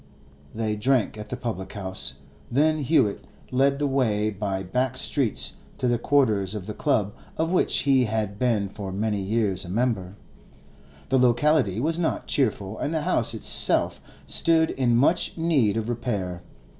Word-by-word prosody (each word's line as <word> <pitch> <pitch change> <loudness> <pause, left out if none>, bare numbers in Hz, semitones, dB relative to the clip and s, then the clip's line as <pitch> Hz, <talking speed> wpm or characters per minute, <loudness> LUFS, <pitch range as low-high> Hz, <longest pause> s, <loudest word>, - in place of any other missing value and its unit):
They 110 -1 -1
drank 120 +1 +1
at 105 0 -8
the 125 - -4
public 105 -7 -5
house, 95 -8 -1 0.3
then 155 +5 +2
Hewett 135 -8 +1 0.3
led 135 +2 +2
the 145 - -1
way 110 -6 +1
by 95 -1 -3
back 125 +7 -1
streets 130 -4 -1 0.2
to 125 - -1
the 120 -1 +1
quarters 110 -9 +1
of 100 -4 -5
the 105 - -5
club 105 -6 0 0.2
of 160 +1 0
which 185 - +2
he 135 -3 +3
had 105 -2 -2
been 115 -5 +1
for 100 -1 -7
many 105 +1 -1
years 100 -1 0
a 90 - -9
member. 100 -3 -1 0.9
The 130 0 +3
locality 125 -4 +3
was 160 +6 0
not 165 - -1
cheerful, 110 -6 -1
and 145 - -2
the 160 -2 -1
house - - 0
itself - - +2 0.2
stood 160 -1 +3
in 120 -3 +1
much 140 +9 +2
need 145 -11 +2
of 110 -1 -2
repair. 105 -7 -3
115 Hz, 160 wpm, -25 LUFS, 100-135 Hz, 0.9 s, he